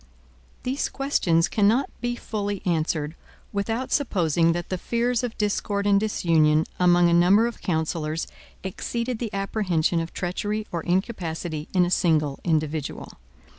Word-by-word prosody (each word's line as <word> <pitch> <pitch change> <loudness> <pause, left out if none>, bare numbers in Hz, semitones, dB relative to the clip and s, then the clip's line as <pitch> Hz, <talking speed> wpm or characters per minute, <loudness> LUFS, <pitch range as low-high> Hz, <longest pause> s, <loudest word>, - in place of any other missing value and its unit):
These 260 +3 -1
questions 175 - +1
cannot 220 +6 +2
be 240 0 -1
fully 205 -4 -4
answered, 160 -3 0 0.4
without 225 +5 -2
supposing 170 - +2
that 175 0 -4
the 185 - -2
fears 235 +2 0
of 240 -2 -4
discord 205 -1 -1
and 200 -1 +4
disunion 160 -7 +2
among 175 -1 +5
a 170 - +3
number 185 +6 +5
of 235 -1 -4
counsellors 160 -1 -1 0.4
exceeded 235 +5 -3
the 230 -4 -3
apprehension 190 -5 0
of 165 0 -4
treachery 205 +4 -2
or 170 - -2
incapacity 175 -4 -2
in 180 -1 +5
a 175 - -3
single 155 -6 +2
individual. 155 -3 -2
180 Hz, 135 wpm, -25 LUFS, 165-215 Hz, 0.4 s, among